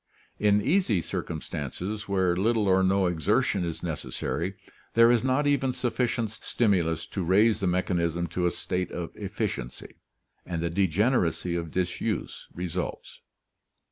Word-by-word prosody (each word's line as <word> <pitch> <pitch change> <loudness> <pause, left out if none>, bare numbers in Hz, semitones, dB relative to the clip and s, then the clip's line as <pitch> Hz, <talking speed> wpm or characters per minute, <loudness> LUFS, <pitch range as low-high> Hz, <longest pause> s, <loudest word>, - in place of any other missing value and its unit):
In 105 0 +3
easy 145 - +2
circumstances, 85 - -4
where 95 -3 +2
little 110 +2 +2
or 95 0 +4
no 95 0 +3
exertion 90 +1 +1
is 85 -2 -4
necessary, 85 +3 -3 0.4
there 115 +1 +7
is 120 -1 +3
not 130 +3 +2
even 140 -3 +2
sufficient 120 -3 -1
stimulus 95 -8 0
to 95 - -4
raise 105 +6 +4
the 95 - 0
mechanism 85 -2 0
to 90 -1 0
a - - +1
state 90 0 -2
of 85 -1 -5
efficiency, - - -4 0.5
and 85 -2 -4
the 85 0 -1
degeneracy 90 -1 +1
of 85 -1 -3
disuse 90 +2 -2
results. 90 -2 -5
95 Hz, 135 wpm, -27 LUFS, 85-110 Hz, 0.5 s, there